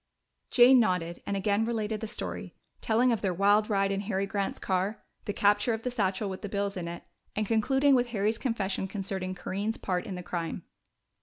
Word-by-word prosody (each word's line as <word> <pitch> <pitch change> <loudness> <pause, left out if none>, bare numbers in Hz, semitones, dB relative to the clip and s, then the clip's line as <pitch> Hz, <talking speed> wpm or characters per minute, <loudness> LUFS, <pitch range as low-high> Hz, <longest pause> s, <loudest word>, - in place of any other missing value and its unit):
Jane 250 +1 +7
nodded 180 -6 0
and 200 - -1
again 205 +2 +1
related 220 -2 -2
the 220 - -3
story, - - -6 0.3
telling 240 +3 +3
of 225 - 0
their 185 -3 0
wild 205 +3 +4
ride 195 -1 +2
in 195 0 -1
Harry 200 -1 -1
Grant's 195 0 -2
car, 190 +3 -1 0.2
the - - -1
capture 205 +3 +2
of 225 - -9
the 250 - -1
satchel 200 -3 0
with 190 -1 -5
the 205 - -5
bills 200 0 -1
in 175 -2 -4
it, 170 0 -6 0.3
and 215 - 0
concluding 265 +6 +3
with 250 -1 +3
Harry's 220 0 0
confession 200 -6 -1
concerning 190 -2 -4
Corinne's 200 +5 -3
part 185 +4 -2
in 195 - -4
the 180 - -6
crime. 170 -2 -4
205 Hz, 200 wpm, -29 LUFS, 190-225 Hz, 0.3 s, Jane